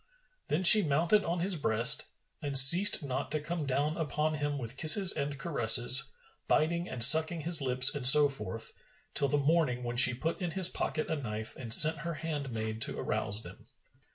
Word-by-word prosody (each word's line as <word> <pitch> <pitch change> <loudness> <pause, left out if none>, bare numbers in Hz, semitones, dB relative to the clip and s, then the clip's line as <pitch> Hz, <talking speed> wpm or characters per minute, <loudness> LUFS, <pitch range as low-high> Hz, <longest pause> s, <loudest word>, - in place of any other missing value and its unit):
Then 160 +5 -5
she 210 +4 +7
mounted 165 +6 -3
on 170 +1 -7
his 190 +1 -1
breast 115 -6 0 0.4
and 140 -2 0
ceased 170 +9 +5
not 130 -1 -8
to 155 - -6
come 155 0 -9
down 145 +4 -5
upon 155 -1 -6
him 145 -1 -7
with 120 -2 -10
kisses 180 +6 +6
and 145 -1 -7
caresses, 130 -2 +2 0.4
biting 170 +3 -4
and 120 - +1
sucking 160 +5 +4
his 165 0 +1
lips 130 -1 +2
and 135 -4 +2
so 145 +2 +6
forth, 115 -5 -8 0.4
till 140 - -2
the 145 +2 -4
morning. 145 -4 -4
when 120 0 -9
she 125 0 +3
put 160 +9 -8
in 175 - -6
his 185 +1 0
pocket 155 - -7
a - - -6
knife 110 -5 -7
and 120 -4 -13
sent 155 +7 +7
her 170 +1 -9
handmaid 125 -9 -9
to - - -4
arouse 105 +1 -6
them. - - -17
145 Hz, 185 wpm, -26 LUFS, 125-165 Hz, 0.4 s, she